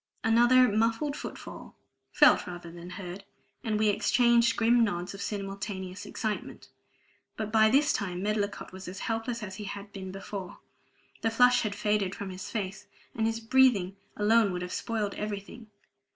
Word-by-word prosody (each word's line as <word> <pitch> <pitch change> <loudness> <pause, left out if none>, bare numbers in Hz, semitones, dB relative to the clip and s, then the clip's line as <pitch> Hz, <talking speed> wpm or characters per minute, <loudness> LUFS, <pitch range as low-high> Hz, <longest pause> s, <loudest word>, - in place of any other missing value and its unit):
Another 240 +3 +5
muffled 230 +7 +1
foot - - -6
fall - - -10 0.4
felt - - +5
rather 175 -1 -8
than 170 +1 -10
heard 180 +1 -7 0.4
and 220 -3 0
we 215 0 +3
exchanged 235 +2 +3
grim 235 +1 +4
nods 180 -4 -2
of 195 - -8
simultaneous 195 -1 -5
excitement. 215 0 -4 0.7
But 215 -1 -3
by 220 0 +5
this 280 +5 +4
time 185 -3 -3
Medlicott 205 -1 -2
was 190 +1 -9
as 185 +2 -7
helpless 225 +1 -2
as 190 -2 -7
he 210 - -6
had 200 0 -7
been 190 -1 -6
before; 195 -1 -7 0.6
the 225 - +2
flush 245 +2 +5
had 210 -3 -2
faded 210 -2 0
from 200 -2 -6
his 185 +2 -7
face, 195 -4 -4 0.3
and 225 0 0
his 225 0 -1
breathing 225 -6 +3 0.2
alone 210 0 +4
would 180 0 -3
have 180 - -5
spoiled 215 -3 -2
everything. 210 +2 -6
210 Hz, 165 wpm, -29 LUFS, 195-225 Hz, 0.7 s, Another